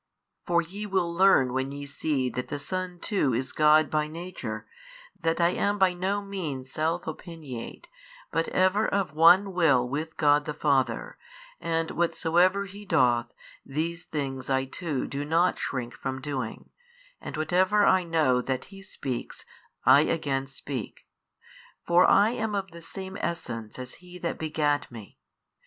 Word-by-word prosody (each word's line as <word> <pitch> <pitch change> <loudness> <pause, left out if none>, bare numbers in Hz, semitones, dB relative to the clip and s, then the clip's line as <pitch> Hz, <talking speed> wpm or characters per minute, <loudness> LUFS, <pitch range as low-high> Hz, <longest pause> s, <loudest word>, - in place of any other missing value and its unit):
For 170 -1 +3
ye 200 +5 -7
will 185 -4 0
learn 170 -9 +4
when 130 +1 -1
ye 140 0 -6
see 140 -2 -1
that 125 - -4
the 145 - -4
Son 180 +4 -4
too 160 - 0
is 130 +2 -2
God 155 -1 +5
by 150 -1 +1
Nature, 155 -10 -6 0.5
that 165 0 0
I 170 0 +4
am 205 +3 0
by 190 -2 +4
no 195 +3 -1
means 155 -10 -5
self 165 +3 -1
opiniate, 155 -6 -7 0.5
but 165 +1 0
ever 185 +4 +2
of 195 -5 -1
one 180 +5 +6
Will 145 -9 +3
with 155 +5 -4
God 145 -1 +4
the 150 - -4
Father, 135 -6 0 0.4
and 165 -1 -1
whatsoever 175 +3 +2
He 200 +1 -10
doth, 120 - +2 0.3
these 165 +4 -3
things 135 -5 -4
I 135 0 +2
too 145 0 -3
do 140 +1 -4
not 165 +4 +2
shrink 125 -3 -3
from 130 -1 -4
doing 130 -4 -5 0.5
and - - -6
whatever 185 +6 +3
I 185 -1 +4
know 155 -7 +2
that 130 0 -3
He 195 - -10
speaks, 135 -9 -6 0.4
I 140 - +8
again 140 -4 -1
speak. 135 -3 -7 0.8
For 175 +1 +5
I 205 +3 +5
am 220 -3 -2
of 195 -2 -3
the 170 0 -11
Same 190 +3 -7
Essence 115 -10 -4
as 125 0 -7
He 180 0 -11
That 170 -1 -3
begat 150 -3 0
Me. 110 -4 -11
160 Hz, 155 wpm, -27 LUFS, 135-180 Hz, 0.8 s, I